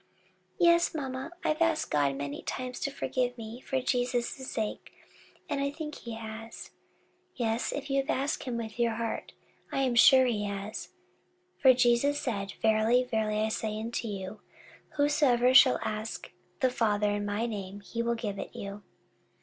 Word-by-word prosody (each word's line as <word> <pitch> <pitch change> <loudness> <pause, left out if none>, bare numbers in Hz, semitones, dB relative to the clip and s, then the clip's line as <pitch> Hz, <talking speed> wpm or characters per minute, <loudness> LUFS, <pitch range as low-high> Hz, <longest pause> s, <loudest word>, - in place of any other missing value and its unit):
"Yes, 340 -1 +4
mamma, 265 0 -4
I've 310 +1 0
asked 330 -1 +2
God 140 -2 +2
many 140 +1 -4
times 255 0 -4
to - - -1
forgive 250 -2 -2
me 225 +1 -7
for 265 - -1
Jesus's 250 +1 -1
sake, 215 -2 -4 0.6
and 285 -2 -1
I 280 - +1
think 300 +1 -6
he 235 -4 -7
has." 225 0 -8 0.6
"Yes, 230 -1 -1
if 285 - -4
you 275 -1 +1
asked 275 0 -1
with 235 -2 -4
your 235 -1 +2
heart, 230 0 -4 0.4
I 270 - 0
am 255 -2 +1
sure 260 +2 +7
he 215 -4 0
has; 200 +2 -5 0.7
for 260 -2 +7
Jesus 250 +4 +3
said, 200 -6 -3
'Verily, 220 +3 +4
verily, 215 -3 0
I 220 - +1
say 215 -1 -2
unto 230 +1 -3
you, 195 0 -5 0.6
Whatsoever 285 -4 +3
ye - - +3
shall 260 -1 +8
ask 215 +1 -4 0.3
the 255 - +3
Father 210 -3 +1
in 205 0 -1
my 205 +3 -1
name, 205 -3 -5
he 230 +3 -4
will 235 0 0
give 210 -3 -4
it - - -7
you.'" 200 +1 -6
235 Hz, 165 wpm, -29 LUFS, 215-260 Hz, 0.7 s, shall